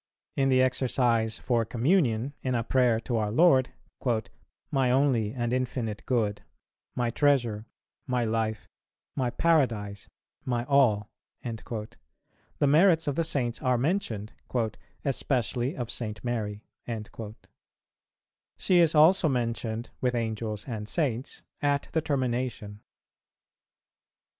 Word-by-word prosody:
In 135 0 +2
the 130 -1 +5
Exercise 120 -3 +1
for 120 -2 +1
Communion, 125 - +1
in 130 -1 -1
a 115 - 0
prayer 125 -2 +3
to 120 0 -2
our 105 -1 0
Lord, 130 -1 +5 1.0
"my 135 -3 +2
only 125 -5 +2
and 120 -1 -2
infinite 125 -4 -2
good, 110 -5 0 0.5
my 120 -1 0
treasure, 120 -6 +1 0.4
my 125 -2 +1
life, 110 -1 -1 0.5
my 130 -3 0
paradise, 120 -9 +1 0.3
my 120 -2 -1
all," 120 -7 +3 0.3
the 115 -2 -6 0.6
merits 160 +3 +5
of 145 - 0
the 165 - 0
Saints 125 -7 -1
are 125 -1 +2
mentioned, 120 - -1 0.7
"especially 130 -1 -1
of 120 -2 -4
St. 110 -3 -5
Mary." 110 -4 -3 1.9
She 180 -2 +3
is 165 -2 +4
also 160 +2 +6
mentioned 115 -2 -2
with 125 -1 +1
Angels 110 -1 -3
and 110 -4 -5
Saints 130 -6 -2 0.2
at 145 -1 0
the 160 - +1
termination. 125 -7 -2
125 Hz, 115 wpm, -28 LUFS, 110-135 Hz, 1.9 s, also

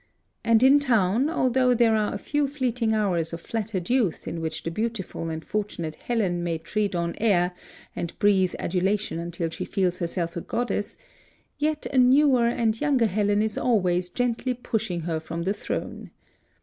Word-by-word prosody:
And 230 +1 +4
in 275 +2 +7
town, 235 0 +2
although 255 -5 +2
there 230 -2 +4
are 215 -1 +1
a - - -3
few 290 +6 0
fleeting 250 -5 0
hours 175 -6 0
of 165 - -5
flattered 205 -5 -3
youth 240 -9 0
in 165 - -4
which 160 -1 -4
the 165 - -3
beautiful 215 -4 -3
and 160 0 -5
fortunate 200 -7 -3
Helen 185 -5 -1
may 170 -1 -1
tread 205 +4 -2
on 170 0 -1
air 180 -5 +2 0.4
and 170 - -5
breathe 190 -3 +3
adulation 190 +1 -1
until 170 -1 -3
she - - -4
feels 185 -2 -1
herself 170 -1 -2
a 170 - -3
goddess, 210 -2 -2 0.6
yet 305 0 -1
a 265 - +1
newer 255 -1 +5
and 225 -2 0
younger 280 -5 +3
Helen 205 0 +1
is 220 -1 -2
always 180 -7 +1
gently 245 +2 -1
pushing 210 -7 -2
her 165 -1 -2
from 165 +1 -5
the 190 +3 0
throne. - - -5
210 Hz, 170 wpm, -25 LUFS, 175-240 Hz, 0.6 s, in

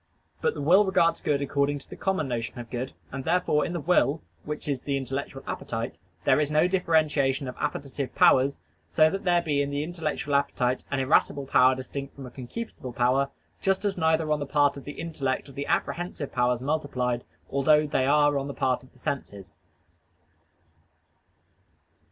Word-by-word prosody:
But - - +1
the 145 - -4
will 185 +7 +6
regards 175 -4 +2
good 145 -1 +1
according 140 +1 0
to 140 - -12
the - - -9
common 190 -6 -1
notion 120 0 -3
of 120 -1 -8
good, 125 +2 -4 0.2
and 135 0 -5
therefore 160 -2 +2
in 175 - -3
the 175 - -2
will, 160 -1 +2 0.2
which 150 0 -5
is 140 -3 -1
the 140 -1 -1
intellectual 135 +1 -4
appetite, 115 +1 -4 0.3
there - - +5
is 150 -1 +1
no 155 +3 +3
differentiation 155 -6 +1
of 125 - -6
appetitive 140 -2 -3
powers, 135 +2 +4 0.3
so 155 - +4
that 195 0 -4
there 175 -1 +3
be 145 -3 +1
in 140 - -1
the 145 +1 -1
intellectual 155 -3 -3
appetite 130 -2 +1
an 140 - -1
irascible 140 0 +2
power 130 0 +5
distinct 135 +2 -6
from 140 - -8
a 125 - -9
concupiscible 130 - -7
power: 130 +3 +2 0.3
just 195 +1 +1
as 200 -1 +1
neither 160 -2 +1
on 150 - +2
the 145 - -4
part 145 0 +3
of 140 - -10
the 145 - -6
intellect 145 -5 -3
are - - -10
the 140 +1 -5
apprehensive 175 -5 -2
powers 125 -1 +1
multiplied, 130 -5 -1 0.3
although 150 +2 +4
they 135 -3 +1
are 145 0 +4
on 135 - -4
the 140 - -6
part 130 -1 +1
of 130 - -19
the - - -22
senses. 100 -9 -5
140 Hz, 185 wpm, -27 LUFS, 130-155 Hz, 0.3 s, will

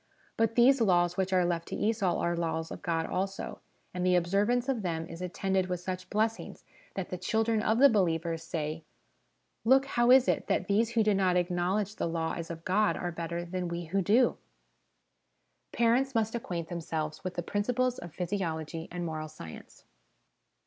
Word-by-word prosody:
But 225 0 +1
these 255 +2 +5
laws 175 -4 +3
which 190 0 -1
are 180 -1 +3
left 170 -1 -1
to - - -4
Esau 205 -5 +1
are 170 0 0
laws 165 -1 -2
of - - -7
God 165 -3 -1
also, 195 +3 -3 0.3
and 180 0 -2
the 180 0 +3
observance 205 +8 +2
of 260 -5 0
them 165 -3 -2
is 165 +1 -9
attended 190 +1 -1
with 180 -1 -2
such 185 0 -5
blessings, 220 +2 -2 0.3
that 190 -2 -4
the 180 - -4
children 225 +1 +1
of 220 +1 +2
the 280 +3 +8
believers 165 - +1
say, 160 -1 -4 0.4
" - - -46
Look, 265 +4 +5
how 240 -3 +1
is 260 0 +7
it - - 0
that - - 0
these 220 +3 +2
who 225 -2 +3
do 210 -1 +3
not 185 -2 +2
acknowledge 180 +4 0
the - - -1
Law 165 -1 -2
as 165 -1 -6
of 165 -1 -7
God 210 +3 +2
are 175 - -3
better 170 +1 -4
than 180 +1 -3
we 170 0 -4
who 195 +5 0
do? 225 +7 +3 0.7
" - - -48
Parents 245 +3 +2
must 225 -1 +1
acquaint 175 -8 -4
themselves 160 -3 -4
with 185 -1 -4
the 175 - -2
Principles 250 +6 0
of 175 - -9
Physiology 165 -3 -3
and 175 0 -4
Moral 155 -1 -4
Science. 120 - -11
180 Hz, 190 wpm, -30 LUFS, 170-220 Hz, 0.7 s, the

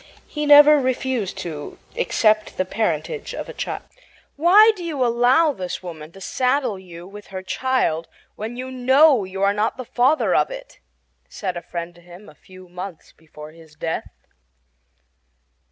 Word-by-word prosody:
He 300 -1 -4
never 295 +1 +8
refused 255 -5 -2
to 155 -4 -7 0.2
accept 215 - +1
the 185 - 0
parentage 430 - -2
of - - -6
a - - -8
child. - - -5 0.5
"Why 390 +9 +6
do 365 - -8
you 295 -7 -1
allow 245 +7 +3
this 185 -4 -6
woman 160 -3 -9
to 195 - -13
saddle 250 0 0
you 175 -2 -11
with 205 +1 -12
her 190 -1 -7
child 185 -8 -1 0.3
when 225 +3 -6
you 255 +1 -6
KNOW 260 -1 +4
you 190 +1 -4
are 200 0 +3
not 210 +4 -1
the 255 - -6
father 260 +7 +2
of - - +2
it?" - - -10 0.5
said 185 -3 -4
a 175 - -5
friend 170 0 -6
to 175 - -19
him 175 +4 -14
a - - -15
few 185 +4 -16
months 180 -1 -9
before 155 -1 -13
his 160 -1 -18
death. 160 +1 -4
215 Hz, 165 wpm, -22 LUFS, 180-265 Hz, 0.5 s, never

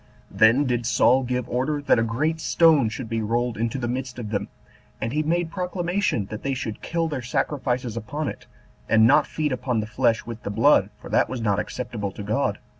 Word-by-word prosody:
Then 115 +6 +4
did 120 -2 -1
Saul 130 +2 +4
give 125 -1 -2
order 130 +5 -1
that 140 -4 +3
a - - +2
great 150 +8 -1
stone 155 -10 +4
should 115 +2 -6
be 115 0 -2
rolled 120 +2 -1
into 115 +3 -2
the 120 -2 -2
midst 130 +1 -4
of 110 -4 -6
them, 100 -1 -2 0.5
and 115 +2 -3
he 150 - +1
made 165 +2 0
proclamation 180 - -1
that 110 - -5
they 135 -1 -1
should 110 -4 -5
kill 165 -1 -1
their 145 -5 -3
sacrifices 125 -1 -2
upon 145 +7 -4
it, - - -7 0.4
and 110 0 +5
not 145 +5 +5
feed 150 -2 -2
upon 125 -2 -1
the 105 - -2
flesh 115 0 +1
with 115 -1 -7
the - - -5
blood, 110 -2 +4
for - - -10
that - - +3
was 130 - -4
not 105 -3 +1
acceptable 110 -2 -4
to 105 - -7
God. 105 0 0
125 Hz, 210 wpm, -24 LUFS, 110-145 Hz, 0.5 s, and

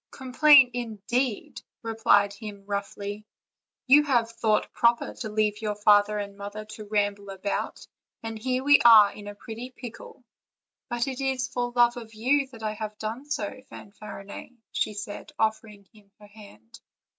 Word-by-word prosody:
"Complain, 265 0 +5
indeed!" 240 0 -3 0.2
replied 210 -3 +2
he 210 +1 -7
roughly; 200 +1 -6 0.6
"you 280 +3 +7
have 240 -6 +1
thought 220 -2 0
proper 235 0 +2
to 220 - -6
leave 210 0 0
your 210 -1 -2
father 205 0 +4
and 200 -1 -5
mother 205 +1 -7
to 215 0 -10
ramble 205 -1 -1
about; 195 +1 -4 0.4
and 225 -1 -6
here 255 +2 -1
we 285 +1 +6
are 215 -4 +8
in 205 -1 -11
a 205 - -7
pretty 230 +3 -8
pickle!" 250 0 -11 0.7
"But 240 -1 -1
it 265 0 -4
is 265 -2 -1
for 245 0 -3
love 240 0 +4
of 225 -2 -10
you 270 +5 +1
that 230 -4 -13
I 215 -1 -2
have 215 0 -6
done 225 +6 -5
so, 255 -1 -4
Fan 200 - -12
farinet," 205 -1 -10 0.2
said 210 +3 -4
she, 305 - -19
offering 215 -2 -2
him 210 -2 -21
her 210 - -15
hand. 200 - -16
215 Hz, 160 wpm, -26 LUFS, 205-245 Hz, 0.7 s, are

